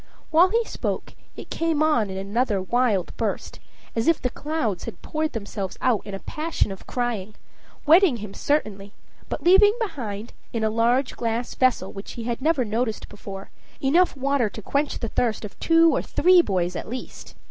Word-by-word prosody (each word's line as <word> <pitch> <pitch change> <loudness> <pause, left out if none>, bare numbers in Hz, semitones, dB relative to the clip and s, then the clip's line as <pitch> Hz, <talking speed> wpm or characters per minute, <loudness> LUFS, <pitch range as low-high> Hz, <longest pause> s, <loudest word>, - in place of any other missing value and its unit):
While 340 +4 +6
he 460 +4 +2
spoke, - - -4 0.2
it - - -10
came 325 -2 +1
on 240 -10 +2
in 190 - -5
another 205 +2 0
wild 205 -1 0
burst, 220 -4 -3 0.4
as 225 0 0
if 330 -2 +4
the 250 - -2
clouds 265 - -2
had - - -8
poured 310 0 -2
themselves 200 -4 -5
out 245 -5 +1
in 200 - -5
a - - -6
passion 310 -6 -2
of 195 - -10
crying, 220 -5 -3 0.5
wetting 325 -3 +6
him 210 -2 -8
certainly, 205 -9 -1 0.4
but 280 - -4
leaving 400 +5 +6
behind, 235 - -4 0.2
in 230 -2 -1
a 220 - +2
large 240 +4 +2
glass 235 +1 -2
vessel 255 -7 +1
which 195 0 -8
he 235 - -6
had 235 +2 -3
never 295 -4 +2
noticed 220 +1 -2
before, 195 -1 -9 0.3
enough 310 +4 +3
water 270 -4 +1
to 220 - -9
quench 285 +5 0
the 230 - -3
thirst 225 -2 -1
of 200 - -11
two 330 0 +5
or - - +1
three 365 0 +5
boys 180 - -1
at - - -5
least. 255 +2 -8
240 Hz, 180 wpm, -24 LUFS, 205-305 Hz, 0.5 s, While